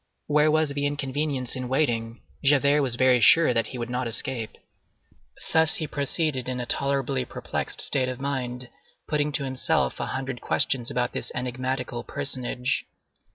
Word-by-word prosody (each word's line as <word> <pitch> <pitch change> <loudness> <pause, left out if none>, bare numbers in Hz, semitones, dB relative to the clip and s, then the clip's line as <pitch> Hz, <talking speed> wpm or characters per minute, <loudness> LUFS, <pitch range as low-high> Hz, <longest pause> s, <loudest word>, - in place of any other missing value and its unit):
Where 150 +1 +3
was 155 0 +2
the 145 0 -1
inconvenience 145 -2 -2
in 130 -1 -4
waiting? 120 -5 0 0.2
Javert 145 +1 +4
was 130 -4 -1
very 125 0 +4
sure 165 +1 +6
that 115 -2 +1
he 130 - -7
would 120 -1 -3
not 125 0 -1
escape. 115 -2 -2 1.0
Thus 160 0 +4
he 160 - 0
proceeded 140 -2 -1
in 125 -1 -2
a 120 - -3
tolerably 135 0 0
perplexed - - -4
state 130 -2 +1
of 130 - -5
mind, 130 -2 -3 0.4
putting 150 -1 +1
to 140 - -1
himself 130 - 0
a - - -2
hundred 130 -2 -4
questions 125 -3 +2
about 125 -1 0
this - - -3
enigmatical 125 -1 -3
personage. 125 -1 -2
130 Hz, 155 wpm, -26 LUFS, 125-145 Hz, 1.0 s, sure